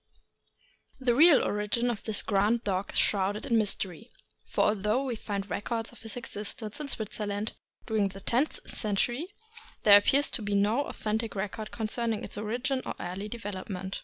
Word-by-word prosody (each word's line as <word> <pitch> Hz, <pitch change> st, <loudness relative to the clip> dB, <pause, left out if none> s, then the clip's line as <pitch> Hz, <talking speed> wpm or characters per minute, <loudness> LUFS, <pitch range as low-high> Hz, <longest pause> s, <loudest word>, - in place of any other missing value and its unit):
>HE 245 Hz, -, +5 dB
real 300 Hz, +4 st, +7 dB
origin 210 Hz, +4 st, 0 dB
of 220 Hz, -, -5 dB
this 220 Hz, -2 st, +1 dB
grand 215 Hz, +3 st, +2 dB
dog 195 Hz, 0 st, -1 dB
is -, -, 0 dB
shrouded 205 Hz, +1 st, +2 dB
in 235 Hz, -, +1 dB
mys 215 Hz, -3 st, +3 dB
tery, 195 Hz, +5 st, -6 dB, 0.4 s
for -, -, 0 dB
although 210 Hz, +5 st, +2 dB
we 250 Hz, -3 st, -2 dB
find 200 Hz, -2 st, -4 dB
records 225 Hz, +2 st, -2 dB
of 240 Hz, -, -16 dB
his 225 Hz, 0 st, -7 dB
existence 215 Hz, 0 st, -5 dB
in 300 Hz, -, -3 dB
Switzerland 210 Hz, -3 st, -3 dB, 0.3 s
during 215 Hz, -3 st, +1 dB
the 195 Hz, 0 st, -9 dB
tenth 250 Hz, +9 st, 0 dB
century, 240 Hz, -, 0 dB, 0.6 s
there 205 Hz, -1 st, +10 dB
appears 275 Hz, +7 st, +3 dB
to 240 Hz, -, -1 dB
be 205 Hz, -1 st, -1 dB
no 215 Hz, +8 st, +2 dB
authentic 220 Hz, +1 st, -3 dB
record 210 Hz, +2 st, -4 dB
concerning 225 Hz, 0 st, -2 dB
its -, -, -5 dB
origin 245 Hz, +6 st, -1 dB
or -, -, -5 dB
early 190 Hz, +4 st, -5 dB
development. 195 Hz, -4 st, -5 dB
215 Hz, 165 wpm, -29 LUFS, 205-235 Hz, 0.6 s, there